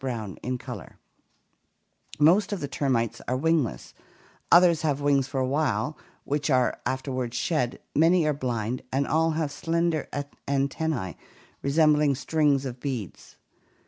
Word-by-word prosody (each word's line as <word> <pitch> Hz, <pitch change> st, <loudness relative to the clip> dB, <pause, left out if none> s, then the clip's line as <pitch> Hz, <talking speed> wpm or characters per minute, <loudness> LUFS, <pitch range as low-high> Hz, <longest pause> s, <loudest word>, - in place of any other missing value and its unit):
COMMUNALISM 115 Hz, -7 st, -4 dB, 0.2 s
253 145 Hz, +3 st, -8 dB
Most 190 Hz, +7 st, +4 dB
of 205 Hz, -, -2 dB
the 145 Hz, -, -3 dB
termites 130 Hz, -5 st, -1 dB
are 130 Hz, -, 0 dB
wingless, 160 Hz, -3 st, 0 dB, 0.6 s
others 170 Hz, -2 st, +6 dB
have 145 Hz, -3 st, 0 dB
wings 140 Hz, -2 st, +2 dB
for 135 Hz, -, -3 dB
a 130 Hz, -, +1 dB
while 150 Hz, +2 st, 0 dB, 0.3 s
which 145 Hz, +1 st, -1 dB
are 130 Hz, -2 st, +2 dB
afterward 130 Hz, -2 st, -3 dB
shed, 125 Hz, -3 st, -1 dB, 0.2 s
many 165 Hz, +2 st, +4 dB
are 150 Hz, -, +2 dB
blind, 125 Hz, -3 st, -2 dB
and 135 Hz, +2 st, +1 dB
all 160 Hz, +2 st, +2 dB
have 155 Hz, -3 st, -1 dB
slender 165 Hz, 0 st, -1 dB, 0.4 s
antennae 140 Hz, -, -1 dB, 0.5 s
resembling 150 Hz, 0 st, +3 dB
strings 145 Hz, -1 st, +1 dB
of 125 Hz, -1 st, -5 dB
beads. 125 Hz, -, -6 dB
140 Hz, 130 wpm, -26 LUFS, 130-155 Hz, 0.6 s, others